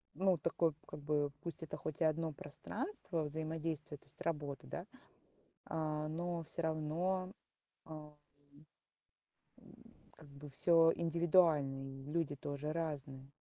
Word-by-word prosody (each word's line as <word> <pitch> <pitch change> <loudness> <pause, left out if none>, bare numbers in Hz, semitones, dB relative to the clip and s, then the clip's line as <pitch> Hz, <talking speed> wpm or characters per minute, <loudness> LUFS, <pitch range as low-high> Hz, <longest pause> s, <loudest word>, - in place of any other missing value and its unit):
ну, 190 -1 +4
такой, 165 +1 +2
как 150 - -7
бы, 145 0 +2
пусть 170 -1 -5
это 160 - -4
хоть 155 0 -5
и - - +6
1 160 0 +2
пространство 165 - -3
взаимодействия, 155 0 -2
то - - -27
есть - - -25
работа, 145 - -2
да, - - -4 0.8
а, 155 -1 -1
но 170 +2 -1
всё 170 - -4
равно 165 +4 +1 0.6
ам 155 -1 -8 1.4
М - - -15 0.4
как 160 - -13
бы 140 +1 -10
всё 165 +3 +6
индивидуально, 165 -4 +4
и 135 0 -7
люди 165 -3 +1
тоже 145 +2 -3
разные. 140 -4 -3
155 Hz, 130 wpm, -38 LUFS, 145-165 Hz, 1.4 s, и